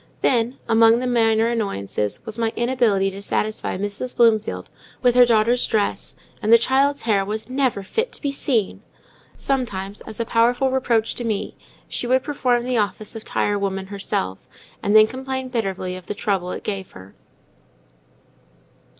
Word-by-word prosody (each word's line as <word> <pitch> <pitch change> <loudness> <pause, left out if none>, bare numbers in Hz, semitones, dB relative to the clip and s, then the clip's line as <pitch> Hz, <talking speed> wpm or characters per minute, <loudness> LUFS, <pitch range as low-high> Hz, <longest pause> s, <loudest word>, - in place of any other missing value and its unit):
Then, 240 +1 +1
among 225 0 +5
the 250 - -2
minor 225 -2 +3
annoyances, 105 - -2
was 220 - -6
my 225 -1 +1
inability 235 -6 +1
to 195 +1 -8
satisfy 215 0 -2
Mrs. 205 +6 -4
Bloomfield 215 - +2 0.4
with 245 -1 +5
her 245 0 +6
daughter's 235 +2 +3
dress; 210 -2 -1 0.3
and 215 - 0
the 230 - +10
child's 275 +4 +1
hair 205 -4 +2
"was 215 +4 -5
never 255 -7 0
fit 455 - -2
to - - -11
be 285 - 0
seen." 245 -7 -1 0.6
Sometimes, 205 -7 -2
as 220 - -8
a 230 - 0
powerful 245 +3 +2
reproach 240 -4 +1
to 240 - -6
me, 215 -3 -2 0.3
she 245 - -3
would 260 +1 +2
perform 250 -5 0
the 250 0 -1
office 210 +1 -2
of 225 - -7
tire 205 0 0
woman 195 -1 -2
herself, 95 - -2 0.4
and 205 - +1
then 215 0 +9
complain 260 +2 -5
bitterly 195 -6 -2
of 185 -1 -11
the 210 - -4
trouble 195 -4 -1
it - - -6
gave 195 -3 -5
her. 95 +1 -13
225 Hz, 165 wpm, -22 LUFS, 200-245 Hz, 0.6 s, the